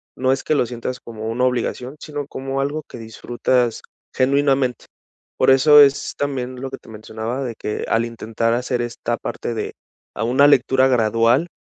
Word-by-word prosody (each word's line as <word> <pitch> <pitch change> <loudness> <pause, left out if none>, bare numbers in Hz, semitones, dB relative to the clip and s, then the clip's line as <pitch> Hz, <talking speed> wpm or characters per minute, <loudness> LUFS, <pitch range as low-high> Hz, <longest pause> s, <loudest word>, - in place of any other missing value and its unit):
no 130 0 +1
es 135 - -1
que - - 0
lo 135 -5 +1
sientas 125 +1 -5
como 110 -1 -8
una 115 +3 -1
obligación, 125 +1 -2
sino 145 -2 -6
como 135 -1 -4
algo 150 +3 -2
que 120 - -10
disfrutas 120 +1 -1 0.3
genuinamente. 135 -2 +1 0.5
Por - - +5
eso 150 +3 +7
es 140 -1 +3
también 130 -3 -3
lo 135 - -5
que 135 - -6
te - - -18
mencionaba, 110 +4 -5
de 120 -3 -4
que 105 - -4
al 115 +1 +2
intentar 115 0 -2
hacer 125 0 -1
esta 120 0 -3
parte 120 - -5
de 110 - -4 0.4
a 110 - -2
una 130 +5 +4
lectura 130 -1 +4
gradual, 115 +4 +2
125 Hz, 175 wpm, -20 LUFS, 115-135 Hz, 0.5 s, eso